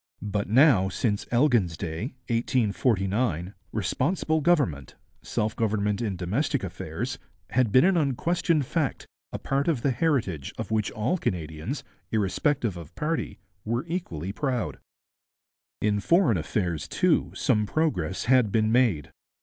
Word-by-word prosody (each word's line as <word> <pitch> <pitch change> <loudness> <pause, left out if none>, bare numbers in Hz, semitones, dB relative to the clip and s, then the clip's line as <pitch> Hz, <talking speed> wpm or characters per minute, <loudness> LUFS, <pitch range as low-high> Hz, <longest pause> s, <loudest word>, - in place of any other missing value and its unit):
But 105 -1 -2
now, 115 -6 +5
since 105 +2 -1
Elgin's 120 - +2
day 90 - -4
(1849), 105 - 0 0.2
responsible 155 - 0
government, 140 - +1 0.3
self 105 +1 -2
government 105 -2 0
in 105 -5 -1
domestic 110 - -1
affairs, 95 +7 -4 0.3
had 125 -4 +2
been 130 +7 +6
an 190 -1 +4
unquestioned 155 +1 +1
fact, 150 0 -2 0.3
a - - -3
part 140 +2 -1
of 150 -9 0
the 140 - +3
heritage 120 - 0
of - - -5
which 110 -2 +1
all 140 +12 -1
Canadians, 80 - -3 0.3
irrespective 110 +1 0
of 85 -2 -11
party, 160 +1 -2 0.3
were 120 +6 -2
equally 95 - -4
proud. 125 -2 -2 1.0
In 105 -1 +2
foreign 165 - +3
affairs, 85 -1 -2
too, - - +1
some 105 -1 +1
progress 95 - -1
had 125 -4 +4
been 110 0 +2
made. 115 - +2
110 Hz, 130 wpm, -26 LUFS, 95-140 Hz, 1.0 s, been